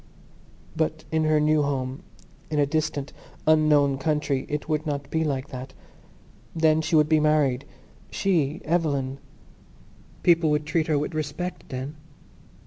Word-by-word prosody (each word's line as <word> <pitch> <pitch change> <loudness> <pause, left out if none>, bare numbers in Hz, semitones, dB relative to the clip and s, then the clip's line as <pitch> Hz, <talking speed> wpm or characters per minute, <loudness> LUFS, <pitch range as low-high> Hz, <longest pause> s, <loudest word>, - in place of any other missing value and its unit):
But 160 0 -1
in 160 0 +1
her 155 0 +3
new 155 0 +3
home, 135 -2 -2 0.5
in 155 - -2
a 145 - +4
distant 150 -1 -2 0.3
unknown 150 -3 +4
country, 150 -2 0
it 150 0 -3
would 155 0 -1
not 140 -1 -3
be 160 0 +1
like 140 -2 -2
that. 130 +1 -8 0.8
Then 160 -1 +3
she 160 +1 0
would 150 -1 +5
be 155 0 +4
married—she, 150 +2 -1
Eveline. 140 -5 0 1.0
People 170 -2 +4
would 150 0 +1
treat 160 0 0
her 155 -2 +2
with 150 +3 -2
respect 155 +4 -4
then. 135 +4 -5
150 Hz, 135 wpm, -25 LUFS, 140-155 Hz, 1.0 s, would